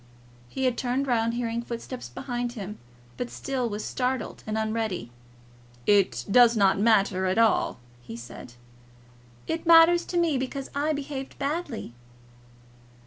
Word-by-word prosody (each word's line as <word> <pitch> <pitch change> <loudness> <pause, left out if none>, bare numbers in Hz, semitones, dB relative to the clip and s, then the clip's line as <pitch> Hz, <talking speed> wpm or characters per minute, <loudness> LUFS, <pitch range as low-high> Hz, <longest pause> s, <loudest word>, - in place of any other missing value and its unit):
He 265 - -2
had 250 -2 +1
turned 255 +2 0
round 230 -2 +1
hearing 235 -1 -2
footsteps 240 +1 -7
behind 245 -2 -4
him, 210 -2 -7 0.4
but 245 -1 -3
still 260 -3 -3
was 210 0 -4
startled 255 -1 -2
and 215 0 -2
unready. 220 - -2 0.7
"It 180 -13 +3
does 240 0 +6
not 195 -1 +4
matter 200 -3 +3
at 185 - 0
all," 225 - +2 0.2
he 115 -1 -9
said. 120 0 -10 0.9
"It 325 +1 -3
matters 335 +1 +7
to 350 - -3
me, 325 -6 +2
because 265 +1 -5
I 290 +2 0
behaved 280 -2 -5
badly." 285 - -3
240 Hz, 140 wpm, -26 LUFS, 215-270 Hz, 0.9 s, matters